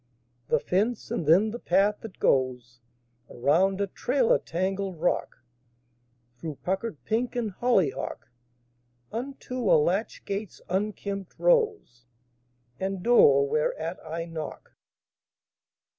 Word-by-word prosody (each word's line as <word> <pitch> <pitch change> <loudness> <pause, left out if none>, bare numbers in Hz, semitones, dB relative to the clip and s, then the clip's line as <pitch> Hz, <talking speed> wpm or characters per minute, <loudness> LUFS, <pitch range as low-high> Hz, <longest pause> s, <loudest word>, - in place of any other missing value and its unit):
The - - +2
fence; 210 +6 -1
and 155 - -2
then 195 +7 +5
the 240 - -6
path 200 +2 +2
that 220 -4 -10
goes 125 -2 0 0.5
Around 180 +10 +2
a - - +2
trailer 245 +5 +1
tangled 190 0 -3
rock, 175 -7 -1 1.0
Through 155 +1 -5
puckered 190 0 -2
pink 240 +3 -1
and 230 -4 -1
hollyhock, 190 - 0 0.8
Unto 255 +1 -5
a - - +7
latch 180 +8 0
gate's 200 0 -4
unkempt 195 0 -3
rose, 430 - +1 0.7
And 190 -1 -3
door 140 - +6
whereat 155 +3 -1
I 165 +1 -4
knock. 160 -2 -7
190 Hz, 110 wpm, -27 LUFS, 160-220 Hz, 1.0 s, a